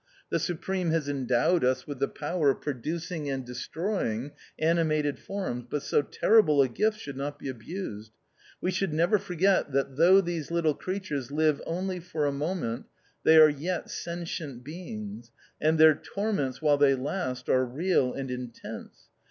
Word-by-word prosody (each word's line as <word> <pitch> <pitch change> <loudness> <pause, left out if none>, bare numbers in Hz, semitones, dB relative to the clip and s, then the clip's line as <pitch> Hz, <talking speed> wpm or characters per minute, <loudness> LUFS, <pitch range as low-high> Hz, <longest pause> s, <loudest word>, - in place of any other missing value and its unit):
The 165 - +2
Supreme 175 +2 -2
has 160 -3 0
endowed 135 +4 +2
us 130 0 +1
with 145 -3 -6
the 140 - +2
power 150 0 0
of 135 - 0
producing 155 +3 -3
and 135 -2 -3
destroying 135 - -3 0.3
animated 155 -2 +1
forms, 185 -12 -4
but 145 +1 -2
so - - +2
terrible 155 -1 +4
a 135 - +6
gift 210 - 0
should 140 -7 -7
not 145 +2 -4
be 140 - -6
abused. 115 - -6 0.5
We 185 - 0
should 185 -2 -1
never 175 +7 +3
forget 185 -3 +1
that 135 -1 0
though 180 +5 +7
these 170 -5 -2
little 170 -2 +2
creatures 185 -7 -4
live 155 0 +2
only 185 +2 -2
for 165 -3 -2
a 145 - +2
moment, 140 -4 -3 0.4
they 160 - +7
are 155 -1 +10
yet 160 +4 -3
sentient 165 -7 -5
beings, 115 - -7 0.3
and 160 +1 +3
their 155 0 +8
torments 155 - -3
while 145 -2 +4
they 140 -1 +5
last 130 -1 -3
are 130 - +3
real 135 +1 +1
and 135 -1 -5
intense. 125 -2 -7
150 Hz, 160 wpm, -28 LUFS, 135-175 Hz, 0.5 s, are